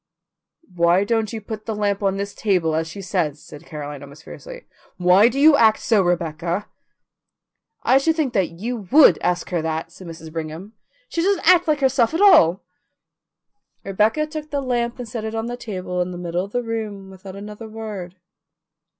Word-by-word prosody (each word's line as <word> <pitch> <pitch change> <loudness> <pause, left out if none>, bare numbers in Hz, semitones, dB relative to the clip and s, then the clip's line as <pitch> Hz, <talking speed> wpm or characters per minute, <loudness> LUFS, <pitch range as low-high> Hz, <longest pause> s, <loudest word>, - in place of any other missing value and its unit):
"Why 170 +2 +3
don't 220 0 0
you 225 - -5
put 215 +1 -8
the 220 - -2
lamp 205 -1 -1
on 195 -1 0
this 200 0 -4
table, 180 -6 0
as 160 +1 -1
she 195 +4 -8
says?" 175 -6 -1 0.2
asked 150 - -12
Caroline, 145 -2 -7
almost 140 +2 -13
fiercely. - - -11 0.3
"Why 180 +4 +5
do 265 +3 -3
you 305 +1 +7
act 220 -5 +5
so, 220 -4 +2
Rebecca?" 175 +1 -1 1.2
"I 265 - +4
should 320 +3 +1
think 295 -7 -1 0.3
you 225 -2 -4
WOULD 300 +1 +7
ask 180 +1 -1
her 175 -2 0
that," 160 +1 -3
said 185 +1 -12
Mrs. 160 -1 -10
Brigham. 165 +6 -6 0.3
"She 335 - -2
doesn't 380 -2 0
act 355 -1 +6
like 300 -2 +1
herself 265 +1 +2
at 345 - 0
all." 305 - +6 1.2
Rebecca 215 +10 +1
took 305 0 -7
the 285 - -2
lamp 240 -2 -1
and 245 -2 -7
set 225 -1 -5
it 220 0 -4
on 225 0 -2
the 240 +1 -4
table 185 -6 -4
in 180 - -2
the 180 - -7
middle 175 +1 -3
of 200 - -14
the 245 +2 -1
room 215 -4 -5
without 190 0 -11
another 210 +2 -9
word. 210 -5 -7
205 Hz, 185 wpm, -21 LUFS, 175-240 Hz, 1.2 s, you